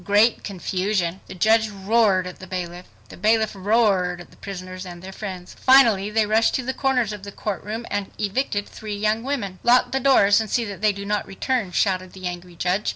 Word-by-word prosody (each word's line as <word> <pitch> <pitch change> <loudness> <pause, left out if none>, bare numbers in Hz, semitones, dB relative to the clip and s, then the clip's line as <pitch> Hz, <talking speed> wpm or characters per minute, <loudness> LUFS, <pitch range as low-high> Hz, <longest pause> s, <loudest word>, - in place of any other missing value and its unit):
Great 210 +4 +3
Confusion! 190 -1 -2
The - - -9
judge 220 +4 +3
roared 200 -1 +2
at 180 - -8
the 190 - -10
bailiff. 180 -1 -5 0.2
The - - -11
bailiff 220 +2 +2
roared 195 -3 +2
at 175 - -12
the - - -19
prisoners 185 -2 -7
and 175 -2 -9
their 190 - -7
friends. 190 -3 -7
Finally 230 -7 +5
they 215 0 +2
rushed 220 +2 +2
to 260 - -1
the 260 +2 -2
corners 255 -6 0
of 210 - -8
the 200 +1 -8
courtroom 215 +3 -4
and 205 -1 -2
evicted 205 0 -1
three 215 -1 -7
young 215 +2 0
women. 230 -9 -3
"Lock 245 +1 +4
the 265 - 0
doors, 225 -6 +5
and 220 - -5
see 235 +2 +1
that 200 -3 -7
they 215 -1 +4
do 200 0 -7
not 210 0 -1
return," 210 0 -2
shouted 185 -1 0
the 185 -1 -9
angry 175 0 -6
judge. 180 +4 0
205 Hz, 210 wpm, -23 LUFS, 185-220 Hz, 0.2 s, Finally